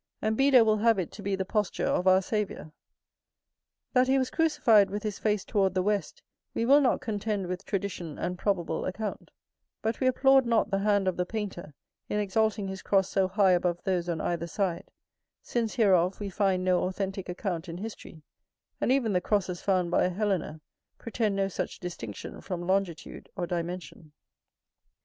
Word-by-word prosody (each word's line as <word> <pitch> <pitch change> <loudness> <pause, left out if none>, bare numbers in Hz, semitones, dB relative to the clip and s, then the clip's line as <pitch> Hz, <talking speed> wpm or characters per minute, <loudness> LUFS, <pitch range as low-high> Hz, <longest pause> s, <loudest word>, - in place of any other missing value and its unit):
And 215 0 0
Beda 270 -2 +5
will 215 -1 +3
have 225 0 +3
it 180 -4 -3
to - - -10
be 200 0 -1
the 190 0 -3
posture 210 0 -1
of 180 - 0
our 185 +1 +5
Saviour. 210 -6 -3 1.2
That 255 -1 +4
he 265 +1 +3
was 260 -1 0
crucified 290 - +4
with 205 +1 -4
his 210 -2 -3
face 210 -2 0
toward 195 -2 +1
the 185 - +2
west, 205 -3 -2 0.3
we 230 - 0
will 280 +4 +6
not 260 - +2
contend 210 -4 -2
with 180 +2 -5
tradition 185 -6 -3
and 180 - -2
probable 180 -4 -1
account; 205 +3 -5 0.5
but 225 +1 -1
we 260 - +2
applaud 270 0 +4
not 230 -1 +2
the 195 - +1
hand 200 -1 +2
of 185 - 0
the 180 - 0
painter, 190 -9 -5 0.3
in 210 - 0
exalting 210 0 0
his 190 0 -6
cross 195 -1 +2
so 190 -1 +2
high 190 0 +3
above 175 -1 +1
those 180 -2 -1
on 165 -2 -1
either 170 -1 -2
side: 180 -2 -2 0.5
since 230 -1 -2
hereof 190 -6 +3
we 200 -2 -4
find 190 -1 +1
no 180 -1 +2
authentic 190 0 -4
account 180 -2 -4
in 165 - -6
history, 190 -6 -9 0.6
and - - +2
even 250 -6 +2
the 180 - +2
crosses 185 -3 -1
found 185 -3 +1
by - - +3
Helena, 185 -5 -2 0.4
pretend 220 -3 -1
no 195 0 +1
such 195 - -4
distinction 120 - -7
from 175 -2 -5
longitude 185 -3 -2
or 180 -3 -2
dimension. 170 -3 -5
195 Hz, 180 wpm, -28 LUFS, 180-215 Hz, 1.2 s, will